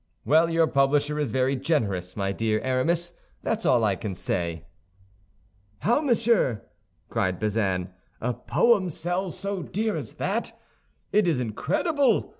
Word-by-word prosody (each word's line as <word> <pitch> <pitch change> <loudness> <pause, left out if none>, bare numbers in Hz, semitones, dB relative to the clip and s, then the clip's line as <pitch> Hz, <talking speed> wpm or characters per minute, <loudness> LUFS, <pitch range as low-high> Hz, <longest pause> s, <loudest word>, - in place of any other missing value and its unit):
"Well, 160 +3 +4
your 165 0 +3
publisher 145 +1 +2
is 145 -4 0
very 130 +4 +1
generous, 105 - -1
my 100 -1 0
dear 110 +1 0
Aramis, 165 +7 0 0.3
that's 225 -1 -1
all 120 -3 +4
I 105 -3 +2
can 95 0 -5
say." 85 -2 -3 1.2
"How, 240 +7 +3
monsieur?" 230 - +2 0.4
cried 95 -1 -1
Bazin, 100 -4 -1 0.3
"a 125 +2 -1
poem 205 - +2
sell 175 +4 -2
so 195 +2 -4
dear 215 +5 -2
as - - -5
that! - - -3 0.5
It 210 -3 +3
is 160 -7 +2
incredible! 250 - +1
140 Hz, 135 wpm, -26 LUFS, -, 1.2 s, Well